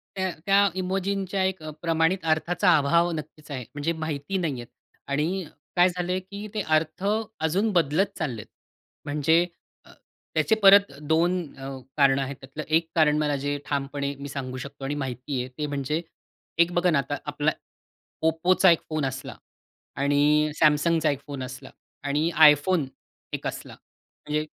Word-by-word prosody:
तर 190 -1 -1
त्या 200 0 +5
इमोजींच्या 190 +1 -1
एक 190 -2 -1
अ, 155 - -5
प्रमाणित 165 +1 +1
अर्थाचा 175 +3 +2
अभाव 170 +4 +3
नक्कीच 155 0 -9
आहे 130 -3 -4
म्हणजे 150 +3 -1
माहिती 155 +2 -3
नाहीयेत 140 -10 -3 0.4
आणि 160 +7 -1 0.3
काय 180 +1 +5
झालंय 180 +1 -2
की 200 +3 -8
ते 215 - -1
अर्थ 155 +3 -1 0.4
अजून 185 +8 +1
बदलत 170 +2 +3
चाललेत. 125 -10 -3 0.6
म्हणजे 150 +4 +3 0.4
अ, - - -18 0.4
त्याचे 220 - +3
परत 200 -1 +8
दोन 165 +4 +2 0.2
अ, 135 0 -7 0.3
कारणं 140 -1 +4
आहेत. 135 +1 -4
त्यातलं 135 +3 -7
एक 165 0 +1
कारण 150 -2 +4
मला 150 -1 +1
जे 145 0 0
ठामपणे 140 0 -2
मी 140 0 -6
सांगू 130 -2 -5
शकतो 140 +2 -8
आणि 140 +2 -2
माहिती 130 +1 -4
आहे 125 - -6
ते 150 - -1
म्हणजे 145 +2 -2 0.6
एक 170 +1 +5
बघा 175 +1 +2
ना 155 - +3
आता 140 +1 -3
आपला 145 +1 0 0.7
Oppoचा 175 +4 +4
एक 165 - +3
फोन 155 -2 -1
असला 130 0 -5 0.6
आणि 145 +2 +3
Samsungचा 155 +1 +3
एक 140 - -4
फोन 140 -2 -5
असला 130 +1 -8 0.3
आणि 145 +3 +1 0.2
iPhone 150 +2 +3 0.5
एक - - -4
असला. - - -6
म्हणजे 150 +1 -6
155 Hz, 155 wpm, -25 LUFS, 140-175 Hz, 0.7 s, परत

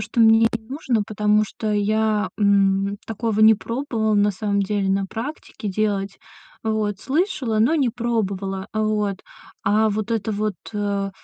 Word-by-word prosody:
что 215 +3 -5
мне 225 0 +6
и 230 0 -2
нужно, 245 -1 -2
потому 210 0 +2
что 215 0 -4
я, 215 +1 +1
м, 200 -1 +2
такого 225 -1 -1
не 220 0 +8
пробовала 230 -1 -2
на 205 0 +3
самом 200 0 -1
деле 200 -1 -1
на 195 0 +1
практике 225 -1 -6
делать. 200 -1 -1 0.4
Вот, 215 -3 -1
слышала, 280 - 0
но 240 +9 +3
не 275 -5 +2
пробовала. 200 -5 -2
Вот. 215 -2 0 0.5
А 215 +2 +3
вот 215 +2 -3
это 225 -1 -1
вот, 210 0 -1 0.2
э, 200 -1 -1
215 Hz, 150 wpm, -22 LUFS, 200-225 Hz, 0.5 s, не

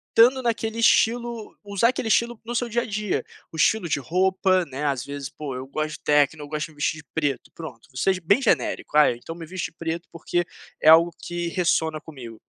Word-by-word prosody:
dando 250 +3 +6
naquele 225 -2 -2
estilo, 235 -1 +2
usar 200 +3 +2
aquele 255 -2 -2
estilo 235 +1 +1
no 240 - -4
seu 240 0 -1
dia 235 +1 0
a - - -6
dia, 210 -2 -2 0.3
o 160 - -9
estilo 175 +2 +2
de 145 - +1
roupa, 185 +4 +2
né, 140 +1 -5
às 135 -3 0
vezes, 140 -1 -5
poxa, 145 -2 -7
eu 130 +1 -6
gosto 155 +2 -3
de - - -36
techno, 150 +1 +2
eu - - -8
gosto 150 +2 -3
de - - -17
me - - -20
vestir 150 +2 0
de 160 - -12
preto 150 -1 -2
pronto, 160 -2 -10
vou 130 - -14
ser 190 +8 +3
ge 185 - -6
bem 200 +10 +3
genérico, 205 - 0
ah, 150 - +6
então 120 +7 -8
me 165 -1 -8
visto 175 0 -5
preto 170 +1 -4
porque 175 +1 -1 0.4
é - - +1
algo 165 +2 +7
que 175 0 -4
ressona 160 -3 0
comigo. 125 -8 -11
170 Hz, 225 wpm, -24 LUFS, 150-215 Hz, 0.4 s, algo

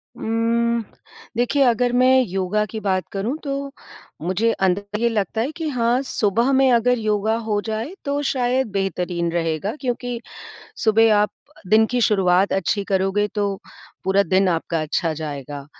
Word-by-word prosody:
उम्म, 230 +1 0 0.5
देखिए 275 +4 +2
अगर 245 0 +2
मैं 255 +1 +5
योगा 190 +3 -1
की 220 +1 -6
बात 190 -3 -1
करूँ 220 +9 -2
तो 275 0 -3 0.5
मुझे 190 +7 +1 0.2
अंदर 205 +3 -2
ये 235 0 +2
लगता 220 0 -1
है 260 +6 -1
कि 325 -2 -3
हाँ 245 -1 +1
सुबह 235 -1 +1
में 265 -1 +4
अगर 245 +1 +3
योगा 215 0 0
हो 210 -1 +1
जाए 225 +9 -3
तो 285 +1 -1
शायद 255 -1 0
बेहतरीन 180 -3 -2
रहेगा 165 - -1
क्योंकि 245 -1 -3 0.7
सुबह 220 0 +5
आप 210 0 +2 0.4
दिन 220 +3 +5
की 245 - 0
शुरुआत 195 -3 +3
अच्छी 195 +2 0
करोगे 195 +2 +1
तो 205 -1 0 0.5
पूरा 190 +1 +3
दिन 190 +1 +2
आपका 165 -1 -1
अच्छा 160 +1 -1
जाएगा। 145 -2 -6
215 Hz, 150 wpm, -21 LUFS, 190-245 Hz, 0.7 s, मैं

